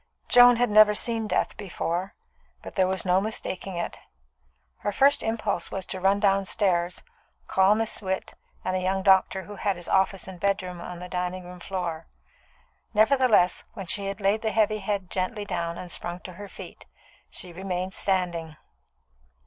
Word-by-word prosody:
Joan 245 0 +8
had 240 -1 +1
never 210 0 +7
seen 225 0 +2
death 185 - 0
before, 185 -1 -3 0.5
but - - -8
there 185 -2 +2
was 190 0 +1
no 185 +1 +3
mistaking 195 -3 -4
it. 170 - -4 0.8
Her 205 - -2
first 275 +7 +4
impulse 215 -5 -2
was 190 - -4
to 190 - -5
run 195 +2 +3
downstairs, 195 -3 +1 0.4
call 190 +2 +4
Miss 225 0 -1
Witt 190 -1 -3 0.3
and 185 - 0
a - - +1
young 190 +1 -1
doctor 190 0 +4
who 205 +1 -10
had 200 0 0
his 175 -1 -6
office 190 0 +1
and 185 -2 -9
bedroom 185 -2 -1
on 180 0 -7
the 180 +1 -8
dining 180 0 -3
room 180 0 -11
floor. 175 -3 -4 0.9
Nevertheless, 220 -5 +4
when 195 -4 -6
she 195 +3 -2
had 195 +1 -4
laid 205 +2 +1
the 220 - 0
heavy 215 0 +2
head 195 -2 -3
gently 200 +3 -2
down 170 -3 -3
and 180 - -8
sprung 175 +1 -3
to 185 - -9
her 205 +3 -9
feet, - - -11 0.4
she 180 -2 -5
remained 185 +1 -4
standing. 175 -5 -1
190 Hz, 170 wpm, -26 LUFS, 180-205 Hz, 0.9 s, Joan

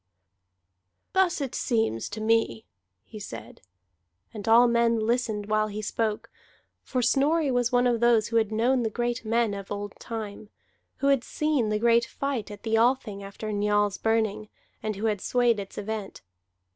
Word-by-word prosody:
"Thus 375 -5 +2
it 270 -3 -3
seems 220 - 0
to 215 +1 -6
me," 220 - +1 0.4
he 215 - -11
said, 115 - -9 0.7
and 210 -1 -7
all 235 +2 +7
men 235 0 +2
listened 220 -2 0
while 215 0 +1
he 215 0 -6
spoke 215 0 -2 0.5
for 255 -2 -2
Snorri 285 +4 +2
was 245 -1 +1
one 245 0 +3
of 240 -2 +2
those 235 -2 +3
who 230 - +1
had 220 -2 +1
known 245 +4 +2
the 225 - 0
great 240 +1 -2
men 225 -1 +1
of 200 -1 -7
old 205 0 -4
time, 215 -2 -6 0.5
who 275 - 0
had 275 -3 +3
seen 300 -8 0
the 215 - +1
great 235 +1 +3
fight 275 -6 -3
at 205 -1 -10
the 225 0 +1
Althing 230 -4 +1
after 200 +2 -6
Njal's 205 0 +1
Burning, 220 -2 0 0.3
and 215 -1 -3
who 205 +3 -4
had 210 -3 0
swayed 240 -3 +2
its 195 -1 -8
event. 210 -1 -5
225 Hz, 170 wpm, -26 LUFS, 210-240 Hz, 0.7 s, all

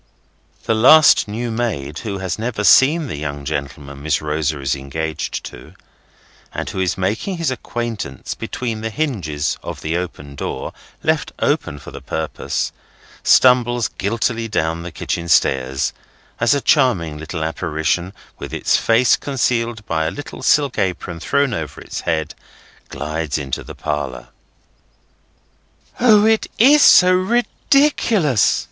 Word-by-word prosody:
The - - +1
last 140 +7 +6
new 115 +3 -4
maid, 95 - -3
who 100 -4 -4
has 95 0 -4
never 110 -2 -3
seen 150 +9 +5
the 125 - -5
young 70 -1 -5
gentleman 70 0 -5
Miss 75 0 0
Rosa 75 -1 -2
is 70 0 -1
engaged 75 +3 -4
to, - - -11 0.8
and - - -5
who - - -4
is 95 -2 0
making 105 - -2
his 165 -5 -1
acquaintance 115 - -5
between 115 -3 -4
the 110 - -3
hinges 95 - -2
of - - -7
the 80 +2 -2
open 85 -5 -6
door, 65 -1 -5 0.3
left - - 0
open 75 - -1
for - - -11
the - - -9
purpose, 80 -1 -3 0.5
stumbles 120 -2 +4
guiltily 115 +3 -2
down 80 -5 -1
the 90 +1 -7
kitchen 85 +3 -4
stairs, 65 -4 +2 0.5
as 115 +3 +3
a 140 - -1
charming 95 - +2
little 80 +1 -5
apparition, 80 +3 -1 0.3
with - - -6
its - - +2
face 115 0 +4
concealed 120 -5 -1
by 80 -1 -1
a - - +1
little 145 - -8
silk 145 -4 +2
apron 90 -2 -2
thrown 140 - +1
over 75 - -5
its - - -6
head, 80 -2 -2 0.6
glides 75 +1 -3
into 70 -4 -4
the - - -10
parlour. 65 -5 -4 1.7
"O! 215 -4 +5
it 220 0 +2
is 285 +6 +6
so 180 -7 +7
ridiculous!" 220 - +2
95 Hz, 140 wpm, -19 LUFS, 75-125 Hz, 1.7 s, so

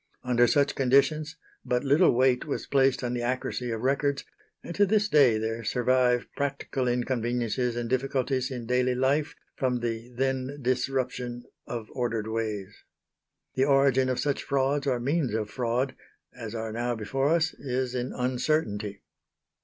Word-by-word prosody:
Under 120 -1 +3
such 140 +1 +2
conditions 150 +4 +2 0.3
but 125 0 0
little 145 +6 +5
weight 125 0 +3
was 145 - -3
placed 135 -2 +2
on 120 0 -1
the 120 - -2
accuracy 125 0 -2
of 115 -1 -3
records; 140 +2 0 0.4
and 170 - -6
to 205 - +3
this 210 +1 +2
day 140 - +5
there 110 +1 -3
survive 125 +1 +2
practical 140 -2 -2
inconveniences 120 -1 -1
and 120 -1 -2
difficulties 130 0 0
in 125 -3 -5
daily 125 +1 +1
life 135 +4 +1 0.2
from 125 -2 0
the 120 0 -4
then 130 +1 -1
disruption 125 -1 -2 0.2
of 115 -3 -5
ordered 115 -4 -2
ways. 110 -3 -4 0.7
The 130 - +2
origin 135 -2 +3
of 130 - -1
such 145 -2 0
frauds 140 +1 0
or 125 -3 +1
means 135 -2 0
of 105 -2 -2
fraud 125 +2 -1 0.4
as 115 -3 -7
are 110 -1 -3
now 120 +2 -1
before 135 +6 -1
us 165 0 +2
is 130 -1 -2
in 125 0 -2
uncertainty. 125 -5 -1
125 Hz, 155 wpm, -27 LUFS, 120-135 Hz, 0.7 s, little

